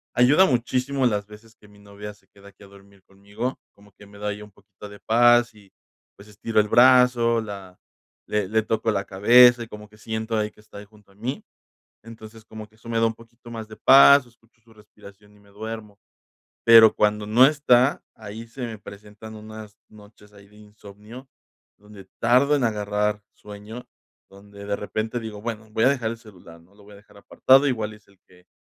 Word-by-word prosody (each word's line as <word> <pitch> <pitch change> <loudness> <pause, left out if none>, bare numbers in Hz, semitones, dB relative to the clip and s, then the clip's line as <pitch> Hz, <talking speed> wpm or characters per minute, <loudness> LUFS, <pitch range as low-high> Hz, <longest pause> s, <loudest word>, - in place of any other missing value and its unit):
Ayuda 140 +9 +4
muchísimo 130 0 -1
las 105 -3 -2
veces 110 +1 -17
que 105 - -22
mi 105 0 -21
novia 105 +1 -11
se 105 - -29
queda 100 0 -18
aquí 100 - -21
a 100 - -15
dormir 100 0 -20
conmigo, 100 +6 -7
como 100 -1 -23
que 105 - -18
me 100 0 -17
da 105 - -5
ahí 105 +1 -6
un 105 - -16
poquito 100 +1 -15
de 105 0 -14
paz 120 0 +3
y, 100 -2 -21 0.4
pues, 100 - -17
estiro 105 +1 -2
el 105 - +1
brazo, 120 -2 +4
la 100 -4 -10 0.5
le 105 -3 -2
le 110 +2 0
toco 110 0 -2
la 100 -1 -3
cabeza, 120 +5 +5
y 115 - -11
como 105 -1 -12
que 110 - -21
siento 110 +1 -5
ahí 105 0 -2
que - - -26
está 105 -1 -13
junto 105 -1 -24
a - - -25
mí. 120 +7 -6 0.6
Entonces, 110 -1 -14
como 110 -1 -11
que 110 - -28
eso 115 - -16
me 115 -1 -2
da 115 - +3
un 115 - -3
poquito 120 +1 -17
más 115 -2 -8
de 110 - -12
paz, 140 0 +6
escucho 115 -1 -28
su 115 0 -23
respiración 105 -1 -19
y - - -24
me 100 - -25
duermo. 105 0 -9 0.7
Pero 115 -1 +7
cuando 105 0 0
no 120 +5 +5
está, 135 -2 +2
ahí 110 +2 -10
se 125 +3 -10
me 110 -3 -9
presentan 105 +2 -13
unas 110 -1 -12
noches 105 0 -19
ahí 100 -1 -18
de 105 - -22
insomnio 105 +4 -15 0.5
donde 105 -2 -16
tardo 130 +5 +3
en 140 - -1
agarrar 105 -1 -2
sueño, 105 +4 -12 0.4
donde 100 +1 -14
de 100 0 -2
repente 110 +3 -5
digo: 110 -2 -9
"Bueno, 110 -1 -7
voy 110 +1 -1
a - - +5
dejar 125 -5 -2
el 115 - -8
celular, 90 -7 -17
¿no?, 90 +4 -27
lo 105 - -21
voy 105 0 -17
a - - -14
dejar 100 0 -21
apartado", 135 +7 +2
igual 110 -4 -3
es 105 -1 -20
el 100 - -26
que 90 0 -24
110 Hz, 205 wpm, -22 LUFS, 105-115 Hz, 0.7 s, Pero